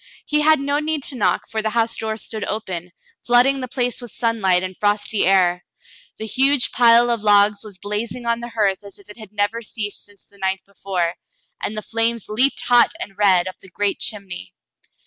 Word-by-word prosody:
He 300 0 +1
had 310 0 +5
no 285 +1 0
need 305 -1 -1
to 275 - -2
knock, - - 0
for 220 -1 -2
the 220 - -1
house 230 0 0
door 220 0 -3
stood 220 -1 -5
open, 180 -5 -4 0.3
flooding 250 +3 +4
the 255 - -4
place 245 -1 -2
with 240 - -9
sunlight 200 -6 +1
and 185 0 -5
frosty 205 0 0
air. 180 -2 +3 0.5
The 220 - -5
huge 265 +4 +2
pile 240 0 +5
of 230 -2 -1
logs 205 0 +4
was 205 -3 -9
blazing 210 +5 -4
on 235 0 0
the 240 0 -7
hearth 205 -4 0
as 200 -1 -10
if 200 +1 -18
it 210 - -15
had 215 -3 -12
never 210 +2 -1
ceased 210 -2 -5
since 205 -1 -14
the 200 - -21
night 190 0 -1
before, 185 -3 -3 0.5
and 215 - -3
the 215 - -4
flames 230 -1 0
leaped 250 +6 +2
hot 245 -1 +4
and 195 - -7
red 190 -3 +3
up 185 - -8
the 190 - -15
great 200 +2 -1
chimney. 190 - -5
215 Hz, 205 wpm, -21 LUFS, 200-235 Hz, 0.5 s, had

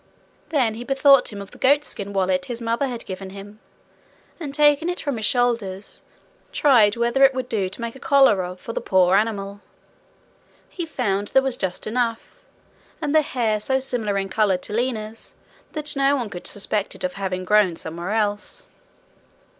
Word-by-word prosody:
Then 260 -8 +1
he 230 +2 -7
bethought 275 0 +4
him 200 -1 -6
of 195 - -15
the - - -15
goatskin 265 -7 +1
wallet 185 -2 0
his 240 -2 -5
mother 235 +3 -1
had 240 -3 -5
given 190 0 -7
him, 200 +2 -11 0.8
and 300 -5 -5
taking 295 +3 +3
it 355 - -3
from 285 -5 -3
his 220 0 0
shoulders, 230 -6 -1 0.5
tried 230 -8 +4
whether 235 +3 +2
it 270 -1 +6
would 255 -1 -3
do 200 -6 -1
to 195 - -10
make 235 +1 -4
a - - -11
collar 270 -10 +4
of 180 +1 -7
for 230 - -7
the - - -3
poor 185 -1 +3
animal. 200 -1 -1 1.1
He 345 -3 -6
found 200 -8 -1
there 265 - +3
was 265 -2 0
just 185 -2 -3
enough, 230 - -2 0.6
and 300 -2 -2
the 310 - +6
hair 235 -7 -1
so 265 +5 0
similar 230 -6 -2
in 195 0 -2
colour 200 -3 +2
to 210 - -8
Lina's, 225 -2 -3 0.4
that 300 -1 -2
no 275 +1 +3
one 240 -6 -3
could 175 - -7
suspect 205 0 -2
it - - -9
of 275 0 -1
having 185 -3 -4
grown 205 -3 +3
somewhere 170 +3 -6
else. 210 - -2
225 Hz, 180 wpm, -22 LUFS, 200-270 Hz, 1.1 s, it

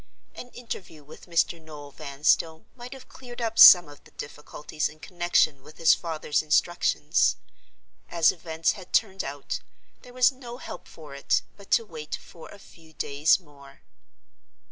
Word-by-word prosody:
An 245 - -10
interview 185 -10 -8
with 150 +5 -15
Mr. 170 -1 0
Noel 150 -2 -11
Vanstone 150 +4 0
might 250 +1 -10
have 265 -1 -13
cleared 245 -2 -12
up 225 -1 -3
some 175 -3 +10
of 145 -1 -15
the - - -19
difficulties 150 +1 -6
in 155 +1 -16
connection 175 -5 0
with 155 +3 -16
his 165 - +5
father's 160 -3 -2
instructions. 155 - +1 0.7
As 165 -2 +3
events 160 -1 -2
had 190 -4 -12
turned 195 -3 +1
out, 140 0 -5 0.4
there 250 - -14
was 255 +1 +4
no 245 -2 -10
help 180 - -10
for 150 -3 -13
it 140 - 0
but 200 -1 -16
to 230 - +3
wait 155 -6 -7
for 165 - -14
a - - -13
few 165 -5 -19
days 145 +4 +2
more. 140 -5 -18
160 Hz, 160 wpm, -26 LUFS, 150-200 Hz, 0.7 s, some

